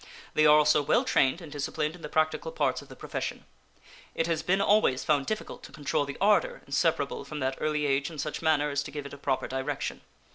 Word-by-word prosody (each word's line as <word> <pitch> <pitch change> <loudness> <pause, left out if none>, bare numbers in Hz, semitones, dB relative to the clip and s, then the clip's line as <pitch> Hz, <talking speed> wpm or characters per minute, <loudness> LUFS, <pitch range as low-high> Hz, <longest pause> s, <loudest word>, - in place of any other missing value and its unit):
They 155 0 +5
are 150 0 +8
also 150 0 +4
well 145 - +2
trained 135 +6 +2
and 160 -3 -10
disciplined 150 +2 -2
in 180 - -14
the 150 - -6
practical 155 - 0
parts 485 - 0
of - - -14
the - - -10
profession. - - -5 0.7
It 165 - +1
has 165 -2 0
been 190 +4 +1
always 200 -11 +3
found 145 -3 +1
difficult 215 - -4
to - - -12
control 145 0 -1
the 140 - -7
ardor 205 +1 +2
inseparable 140 +1 0
from 150 - -7
that 130 0 -1
early 150 -1 0
age 140 0 +1
in 160 - -10
such 150 +1 -4
manner 150 -2 +2
as 145 0 0
to 145 - -7
give 145 -1 -6
it 140 - -8
a - - -8
proper 135 -2 -1
direction. 135 +2 -3
150 Hz, 225 wpm, -28 LUFS, 140-160 Hz, 0.7 s, are